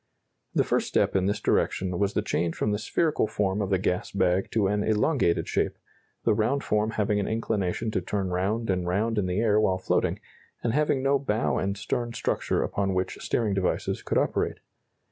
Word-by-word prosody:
The - - +4
first - - 0
step - - +1
in 95 0 +2
this 100 - 0
direction 90 -2 0
was 100 0 +1
the - - +1
change 85 -1 -1
from 105 - 0
the 105 - 0
spherical 155 +1 +1
form 105 -2 0
of 100 - -1
the 95 - +3
gas 90 0 -1
bag 95 -1 +1
to 110 -3 +1
an 105 +1 +1
elongated 110 - +1
shape, - - 0 0.5
the - - +3
round 120 +7 +1
form 105 +1 +1
having 105 -1 +1
an 100 - -1
inclination 110 -1 -1
to 95 - 0
turn 95 +1 -2
round 100 +5 0
and 90 -1 -1
round 105 +5 +1
in 95 - 0
the 90 +2 0
air 105 -2 +3
while 95 -3 +2
floating, 95 - 0 0.4
and 115 - 0
having 145 -2 +1
no 140 0 +3
bow 115 -5 0
and 100 +1 -1
stern 120 +3 -2
structure - - 0
upon 95 -2 -1
which 95 0 -2
steering 110 -4 0
devices 95 -2 -1
could - - -1
operate. - - 0
105 Hz, 200 wpm, -27 LUFS, 95-110 Hz, 0.5 s, The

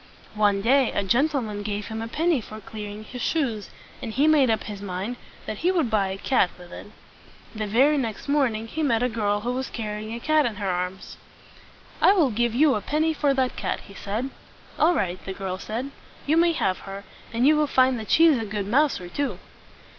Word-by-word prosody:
One 205 -2 +2
day 260 +2 +4
a 200 - 0
gentleman 235 -1 0
gave 205 0 -4
him 220 0 -4
a 225 - -4
penny 315 +2 +1
for 215 0 -9
cleaning 210 0 -8
his 245 +3 -8
shoes, 240 -10 -1 0.3
and 230 - -4
he 275 +7 +2
made 295 -5 +5
up 220 -1 +1
his 205 -2 -7
mind 200 +4 -4 0.3
that 215 - -5
he 355 +3 +2
would 320 -11 0
buy 205 -3 +2
a 190 0 -4
cat 195 -3 +2
with 180 -1 -13
it. - - -9 0.7
The 215 -1 -3
very 275 +8 +4
next 225 -2 -4
morning 260 -7 +1
he 305 +8 -4
met 245 -6 +2
a 250 - +2
girl 205 -2 0
who 245 +3 -2
was 260 +1 -3
car 220 -3 -4
ry 210 - -5
ing 215 +1 -7
a - - -5
cat 310 +2 +3
in 225 - -4
her 200 0 -3
arms. 180 +1 -4 0.8
"I 390 - +7
will 320 -10 +3
give 235 +1 0
you 290 +2 +5
a 210 - -1
penny 310 +5 +1
for 285 -2 +1
that 260 -1 0
cat," - - -3
he 200 - -14
said. 220 +7 -4 0.5
"All 335 +3 +4
right," 185 - -2
the 190 - -5
girl 190 -1 -4
said. 240 +8 -4 0.3
"You 300 - +2
may 335 0 +4
have 185 - 0
her, 195 +1 -7 0.3
and 235 +2 +1
you 305 +2 +6
will 300 0 +2
find 260 -2 +3
that 215 - -8
she 330 - +6
is 305 -7 +5
a - - -2
good 205 -1 -3
mouser 250 -4 +1
too." 280 +10 -2
230 Hz, 225 wpm, -25 LUFS, 205-280 Hz, 0.8 s, I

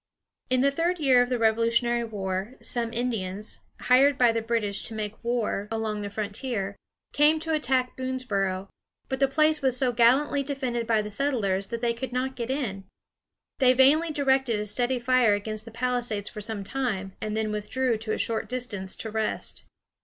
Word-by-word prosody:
In 255 0 +2
the 280 +1 +4
third 335 +5 0
year 260 -4 +5
of 245 - +1
the 250 - +1
Revolutionary 230 +1 +2
War, 200 +1 -4
some 235 -2 0
Indians, 215 -4 -3 0.2
hired 270 +2 +5
by 245 -2 +5
the 230 0 -1
British 220 -3 -1
to 225 - -7
make 215 0 -5
war 230 -4 -1
along 220 -2 -2
the 205 - -4
frontier, 205 0 -3 0.4
came 300 +2 +4
to 320 0 -2
attack 260 -4 +1
Boonesboro. 205 -8 -2 0.4
But 265 - -2
the 275 - +4
place 305 +2 +2
was 260 -2 +1
so 255 -1 +2
gallantly 255 +5 +3
defended 260 -4 -3
by 220 -2 +2
the 210 - -6
settlers 200 -7 0
that 230 0 -5
they 235 -1 +1
could 245 +2 -5
not 260 +1 -1
get 240 -1 -4
in. 225 -9 -3 0.7
They 255 -2 +6
vainly 285 +6 +5
directed 265 -6 +1
a 210 - -2
steady 245 +5 0
fire 245 -3 +3
against 215 +1 -5
the - - -9
palisades 240 -3 -1
for 210 - -8
some 210 -1 -4
time, 195 -6 -3
and 215 0 -2
then 220 -1 -1
withdrew 230 +3 -1
to 220 0 -4
a - - 0
short 220 -2 -1
distance 220 -7 -4
to 220 - -6
rest. 220 0 -2
235 Hz, 185 wpm, -26 LUFS, 215-260 Hz, 0.7 s, They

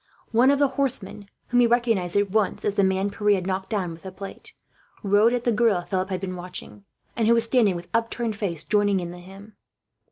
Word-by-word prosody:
One 240 +4 +4
of 280 - +4
the 285 -1 +3
horsemen, 210 -7 -3 0.2
whom 245 - +3
he 240 - +5
recognized 230 -7 +1
at 200 -1 +1
once 215 -1 0
as 205 - +1
the 200 - +2
man 190 +1 +1
Pierre 210 0 +2
had 185 -2 -3
knocked 190 0 -3
down 195 -6 -2
with 165 0 -11
the 190 - -8
plate, 195 +1 -10 0.5
rode 205 +3 +4
at 245 -1 -1
the 240 - +2
girl 220 -4 +3
Philip 190 0 -2
had 185 -1 -2
been 185 -1 -4
watching; 180 +3 -9 0.3
and 225 -2 +1
who 235 - +5
was 230 - +3
standing, 230 -5 +2
with 175 0 -7
upturned 230 -1 -1
face, 180 -7 -3
joining 205 -2 +2
in 175 -1 -5
the 175 - -10
hymn. 195 +4 -13
205 Hz, 225 wpm, -24 LUFS, 190-230 Hz, 0.5 s, he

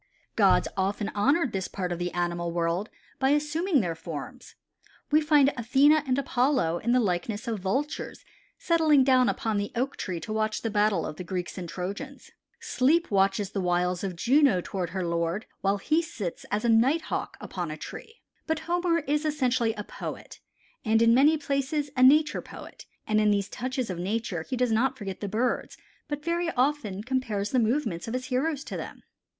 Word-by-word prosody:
Gods - - +4
often 200 +2 -1
honored 275 +6 +2
this 190 -1 -2
part 180 -3 -4
of 175 - -3
the 175 0 -2
animal 175 -1 -2
world 170 +4 -1 0.3
by 265 - +2
assuming 300 +2 +2
their 175 -4 -2
forms. 160 -3 -8 0.6
We 305 +1 +5
find 295 -2 +4
Athene 265 +5 +4
and 280 -4 +1
Apollo 250 - +1
in 235 - -1
the 250 - +4
likeness 205 +3 -2
of 225 -3 -2
Vultures 260 +11 -3 0.3
settling 315 -5 +4
down 255 -1 +4
upon 220 -2 -1
the 205 0 -2
Oak 260 +4 -1
tree 180 -3 -4
to 215 - -5
watch 215 0 -1
the 225 - -1
battle 205 -4 +2
of 155 - -6
the - - -5
Greeks 180 0 -4
and 180 -3 -6
Trojans. 200 - -6 0.3
Sleep 310 +5 +1
watches 195 0 +2
the 195 - -2
wiles 180 0 0
of 190 -2 -3
Juno 260 - +4
toward 180 -1 -4
her 185 0 -3
lord 170 +4 -1
while 200 +1 +1
he 310 +11 +1
sits 225 - -6
as 210 +3 -1
a - - +3
Nighthawk 265 +9 +1
upon - - -5
a - - -5
tree. 450 +1 -10 0.3
But 320 0 -1
Homer 345 -1 0
is 295 +1 0
essentially 255 -7 +1
a 210 - -5
poet, - - -8 0.4
and 225 -1 +3
in 230 0 +5
many 290 +6 +5
places 280 0 -2
a 255 - +1
nature 300 +4 +5
poet, - - -12 0.2
and 215 0 +2
in 210 - +3
these 200 -1 +1
touches 255 -3 -3
of 175 - -5
nature 195 -2 -2
he 255 +10 -4
does 250 -1 +1
not 260 +4 +1
forget 195 -4 -6
the 205 - -4
birds, 230 +4 -1 0.3
but 295 0 -5
very 340 0 0
often 250 -7 0
compares 225 -5 -2
the 255 - +3
movements 225 - 0
of 225 - -3
his 255 0 -3
heroes 275 +3 -1
to - - -7
them. - - -7
230 Hz, 190 wpm, -27 LUFS, 195-280 Hz, 0.6 s, We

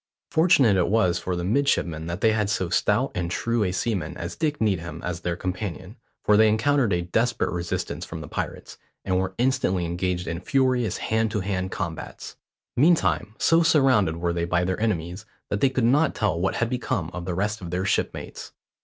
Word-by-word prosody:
Fortunate 145 - +4
it 90 - +2
was 100 -5 +2
for 90 - -3
the 90 - -3
midshipmen 90 - 0
that 85 +3 -4
they 110 - +4
had 105 -2 0
so 95 -4 -1
stout - - +1
and 85 -1 -2
true 115 +5 0
a 90 - 0
seaman 90 -4 -2
as 85 - -5
Dick 150 -2 -1
Needham 85 -7 -1
as 85 -1 -3
their 85 -1 -2
companion; 95 +2 -5 0.3
for 105 - +4
they 110 0 +6
encountered 120 +2 +2
a 85 -1 +1
desperate 115 +7 0
resistance 85 -1 -3
from - - -7
the - - -8
pirates, - - -5 0.3
and 95 -1 +1
were 95 0 -2
instantly 105 -8 +1
engaged 90 +1 -2
in 85 0 -3
furious 125 0 +1
hand 110 0 0
to 105 -1 -2
hand 95 -1 -2
combats. 80 -3 -6 0.4
Meantime, 125 -7 +2
so 165 0 +4
surrounded 130 - +3
were 85 0 -1
they 85 0 -1
by 85 0 +1
their 95 +3 -2
enemies, 95 -1 -2 0.2
that 100 - -1
they 135 - +5
could 130 -2 -1
not 140 +6 +3
tell 105 -6 0
what 95 +2 0
had 120 - 0
become 105 -9 -2
of 90 -1 -5
the 90 -1 -3
rest 105 +3 -1
of 90 - -6
their 90 +2 -2
shipmates. 100 - -3
95 Hz, 200 wpm, -25 LUFS, 90-115 Hz, 0.4 s, they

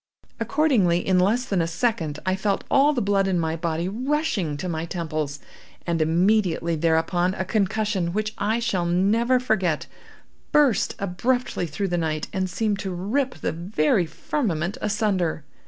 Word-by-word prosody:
Accordingly, 230 - +2
in 185 -1 +4
less 220 +7 +2
than 195 -7 0
a 165 - 0
second, 165 -4 -1
I 185 0 +1
felt 195 +1 -1
all 280 +2 +5
the 250 -6 -1
blood 200 -1 +2
in 185 -2 +1
my 160 -1 -1
body 165 +1 -2
rushing 235 - -1
to 180 - -4
my 160 -2 -2
temples, 155 -4 -3 0.5
and 170 -2 0
immediately 170 0 +2
thereupon, 170 +3 +1
a 190 - -2
concussion, 200 -3 0
which 215 +3 -2
I 210 +3 +1
shall 200 -7 0
never 220 +8 +2
forget, 190 -10 0 0.7
burst 290 -8 +3
abruptly 200 +1 -1
through 190 +6 -3
the 175 0 0
night 155 -2 -2
and 190 -1 -1
seemed 205 +2 -1
to 195 - -3
rip 250 +9 -1
the 155 - -2
very 170 0 +1
firmament 180 - -2
asunder. 195 -7 0
190 Hz, 155 wpm, -24 LUFS, 170-220 Hz, 0.7 s, all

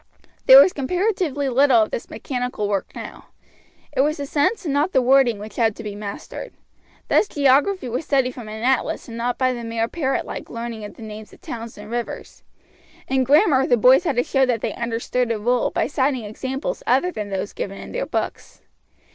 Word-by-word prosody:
There - - +11
was 375 - +6
comparatively 345 -1 -1
little 260 -3 +4
of 215 - -5
this - - -5
mechanical 250 -5 -3
work 200 -2 -1
now; - - -9 0.7
it 265 - +2
was 300 +2 +1
the 285 - -4
sense 300 +9 0
and 290 - -1
not 295 +6 +1
the - - +5
wording 255 -3 +4
which 210 0 -10
had 225 -3 +2
to 230 - -9
be 210 -1 -5
mastered. 205 -1 -7 0.5
Thus - - +3
geography 285 +4 +2
was 245 +6 -3
studied 265 -4 +1
from 240 -4 -9
an 220 +1 -7
atlas 260 0 0
and 230 - -8
not 240 +1 -2
by 255 -1 +1
the 240 -1 -6
mere 230 0 -1
parrot 270 -2 -1
like - - -7
learning 230 -2 -6
of 205 - -10
the 230 - -11
names 215 0 -9
of - - -18
towns 230 -1 -7
and 210 +1 -10
rivers. 240 0 -5 0.7
In 265 -1 +2
grammar 280 - +4
the 245 - +4
boys 255 +8 +6
had 315 -7 0
to 245 - +2
show 270 +1 +1
that 245 -4 +1
they - - -2
understood 235 +1 -2
a 225 - 0
rule 240 +3 +1
by - - 0
citing 265 -3 0
examples 265 - -4
other 270 +9 +2
than 210 -9 -5
those 195 +1 -4
given 195 0 -5
in - - -9
their - - -3
books. - - -4
250 Hz, 205 wpm, -22 LUFS, 230-280 Hz, 0.7 s, There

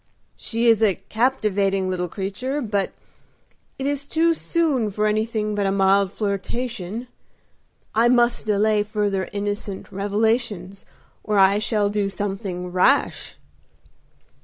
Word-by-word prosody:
"She 230 +1 -2
is 225 -2 +5
a 205 -4 +4
captivating 205 -5 0
little 180 -1 -2
creature, 205 - -3
but 205 -7 -1 0.9
it 270 - -4
is 285 0 -2
too 330 +3 +3
soon 310 -9 0
for 210 +1 -1
anything 215 0 0
but 205 -1 0
a - - +1
mild 195 0 +3
flirtation. 215 +2 -3 0.9
I 230 +2 +4
must 240 -2 +2
delay 210 0 +3
further 205 -2 -1
innocent 205 -1 -4
revelations 205 -1 -1 0.4
or 210 -1 0
I 195 +1 +5
shall 210 -2 +1
do 205 -1 0
something 195 -3 -4
rash." 185 +11 +2
210 Hz, 120 wpm, -22 LUFS, 195-230 Hz, 0.9 s, is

